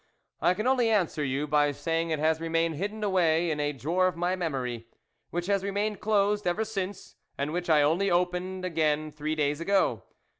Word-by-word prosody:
I 180 - +3
can 215 +4 -3
only 250 -3 +3
answer 180 -8 +1
you 140 +2 -1
by 145 0 +2
say 165 +3 -1
ing 165 - -4
it 160 - 0
has 160 +1 +1
remained 165 0 0
hidden 210 +4 -4
away 175 -4 +2
in 150 - -2
a 145 0 0
drawer 165 +7 +1
of 180 - -2
my 175 +2 0
memory, 130 -9 -3 0.4
which 175 +1 -3
has 200 0 +1
re 200 - -2
mained 205 +1 -1
closed 205 -2 +1
ever 210 +6 0
since, 200 -3 -5 0.2
and 140 +2 -2
which 175 0 -3
I 150 -2 +5
only 170 +7 +2
opened 180 +1 -1
again 155 -3 0
three 155 +1 -3
days 150 0 0
ago. 175 - +2
170 Hz, 200 wpm, -28 LUFS, 150-195 Hz, 0.4 s, I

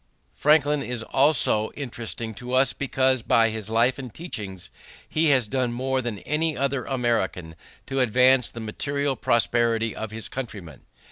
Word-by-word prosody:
Franklin 150 -1 +3
is 120 -3 -4
also 130 -6 +3
interesting 120 -4 -5
to 125 +2 -4
us 130 +1 +3
because 130 -2 +1
by 115 0 +3
his 110 -1 -3
life 120 +4 +2
and 130 -3 -7
teachings 105 - -7 0.4
he 160 +1 0
has 130 -5 +3
done 125 +1 -1
more 130 +2 -1
than 120 -4 -4
any 155 +1 0
other 140 -1 -1
American 115 - -1 0.3
to 135 0 -2
advance 125 +1 +4
the 115 - -9
material 140 +5 -2
prosperity 115 -2 +1
of 110 - -5
his 110 -1 -6
countrymen. 100 - -7
125 Hz, 150 wpm, -24 LUFS, 110-135 Hz, 0.4 s, advance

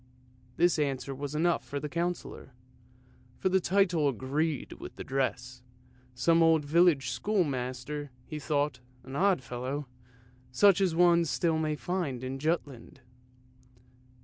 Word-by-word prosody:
This 175 -1 +3
answer 140 -2 -1
was 145 +2 -5
enough 170 +2 +1
for 140 - -5
the 150 - -4
Councillor, 170 -5 -4 0.8
for 190 - 0
the 190 +1 +3
title 180 -5 +2
agreed 140 +4 -2
with - - -9
the - - -7
dress. 130 -2 -2 0.5
Some 165 +6 +3
old 160 -2 +4
village 155 -5 +3
schoolmaster, 140 - -2 0.2
he 155 -2 -6
thought, 145 -1 -1 0.2
an 135 +1 -9
odd 190 -4 +2
fellow, 130 +4 -4 0.7
such 195 +9 +5
as 180 -4 +2
one 170 0 +5
still 160 +4 0
may 155 -1 0
find 145 -3 -3
in 130 +1 -4
Jutland. 145 -3 -3
150 Hz, 130 wpm, -29 LUFS, 135-170 Hz, 0.8 s, such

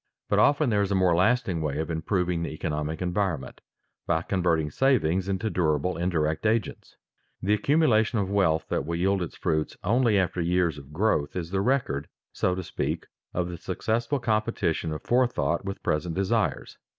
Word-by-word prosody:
But - - +3
often 145 -3 +4
there 105 -1 +2
is 100 - 0
a 100 - +1
more 90 -2 +3
lasting 95 -2 +2
way 75 -2 -2
of 80 +2 -2
improving 85 +1 -1
the 85 - -2
economic 75 +1 -3
environment 90 -7 -2 0.5
by 80 0 +1
converting 85 -6 0
savings 95 - +2
into 100 +3 -1
durable 80 0 +1
indirect 85 0 0
agents. 110 -1 -2 0.5
The 100 +2 +2
accumulation 120 -3 +3
of 100 -3 0
wealth 95 -5 +2
that - - 0
will 85 +4 -3
yield 95 +3 +1
its 85 - -5
fruits 80 0 -1
only 115 +1 +3
after 90 -2 0
years 85 -3 +1
of 70 0 -14
growth 75 -4 0
is 85 -2 -4
the 95 0 +1
record, 100 - 0 0.3
so 90 - 0
to 95 - -4
speak, - - -3 0.3
of 90 -1 0
the 90 -1 -6
successful 115 - -1
competition 110 -9 0
of 75 -1 -5
forethought 120 - +1
with 95 0 -5
present 80 +2 -1
desires. 95 -4 -1
90 Hz, 175 wpm, -26 LUFS, 80-105 Hz, 0.5 s, often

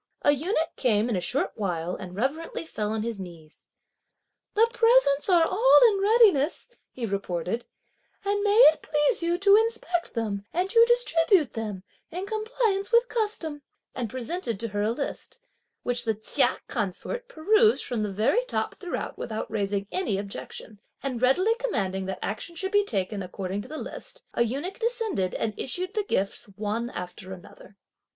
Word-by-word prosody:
A 290 - +6
eunuch 320 +3 -1
came 225 -2 +2
in 230 - 0
a 180 - -1
short 280 - -1
while 180 -4 -2
and 185 -2 -8
reverently 290 +9 -2
fell 210 -9 -3
on 220 -1 -1
his 230 -3 -4
knees. 170 -4 -11 0.9
"The 450 +2 +5
presents 455 - +4
are 345 -3 +5
all 460 +9 +5
in 400 - -1
readiness," 405 - +4 0.2
he 245 - -5
reported, 195 +1 -2 0.6
"and 405 0 +1
may 410 +1 +2 0.2
it - - -18
please 300 +9 +1
you 340 +1 +1
to 400 +2 +6
inspect 445 - -1
them 210 -3 -2
and 365 +3 -1
to 460 0 +7
distribute 360 - +3
them, 210 -4 -5 0.3
in 360 +4 -4
compliance 435 -1 -1
with 470 +1 +4
custom;" 410 -10 -2 0.3
and 240 -3 -3
presented 255 - -4
to 230 - -3
her 205 0 -2
a 210 - +1
list, 280 - -5 0.4
which 245 0 -1
the 220 -2 0
Chia 215 - +1
consort 240 - -3
perused 430 +4 +3
from 240 -3 -2
the 210 -1 -2
very 220 - +2
top - - -2
throughout 360 -3 -5
without 220 -1 -4
raising 200 -2 -1
any 365 - 0
objection, 200 +1 -8 0.2
and 255 -4 -3
readily 365 - +4
commanding 190 - -1
that 190 -1 -3
action 220 +12 -5
should 380 +3 -4
be 410 0 +4
taken 200 - -2
according 190 +1 -4
to - - -11
the 310 - -7
list, - - -8
a - - 0
eunuch 280 - -2
descended 450 - -1
and 220 -1 -1
issued 365 +9 -3
the 430 - +1
gifts 195 - -1
one 215 +3 -2
after 185 -1 -7
another. 190 +2 -14
270 Hz, 170 wpm, -26 LUFS, -, 0.9 s, to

